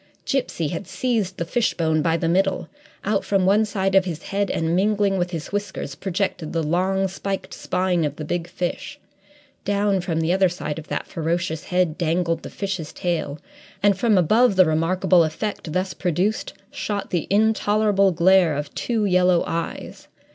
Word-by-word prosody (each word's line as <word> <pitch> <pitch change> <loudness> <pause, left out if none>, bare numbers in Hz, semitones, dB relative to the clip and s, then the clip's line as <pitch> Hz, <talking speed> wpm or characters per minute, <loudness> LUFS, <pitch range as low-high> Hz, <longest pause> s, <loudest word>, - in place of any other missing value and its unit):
Gipsy 210 - -1
had 170 +5 -5
seized 220 -7 -1
the 170 - -2
fishbone 165 -7 +1
by 165 +1 +1
the 165 - -1
middle. 190 0 +1 0.4
Out 200 -1 +1
from 195 -2 +1
one 205 +3 +4
side 195 -2 -1
of 195 -1 +5
his 170 -3 -5
head, 200 0 -1
and 165 +1 0
mingling 200 0 +2
with 175 0 0
his 165 -3 -6
whiskers, 200 -8 -4
projected 185 -1 -3
the 165 -1 0
long, 190 +5 +1
spiked 195 +1 -5
spine 180 -2 0
of 145 -1 -2
the 155 - -6
big 175 +2 -2
fish: 175 0 -4 0.7
down 200 -1 +1
from 170 -3 -2
the 165 +2 +1
other 190 -1 +3
side 165 -3 -4
of 160 - -11
that - - -3
ferocious 165 0 -2
head 180 -2 0
dangled 165 0 0
the - - -8
fish's 190 -6 -4
tail, 160 -5 -2 0.5
and 205 -1 +5
from 215 +1 +2
above 215 +6 +4
the 185 -1 +6
remarkable 170 +2 +3
effect 160 +2 -3
thus 185 +3 -1
produced 185 +4 -1 0.2
shot 205 -2 -4
the 175 -3 -1
intolerable 205 -1 +3
glare 175 -1 +4
of 145 0 -4
two 225 -3 -1
yellow 180 -2 +3
eyes. 165 0 -5
185 Hz, 170 wpm, -23 LUFS, 165-200 Hz, 0.7 s, the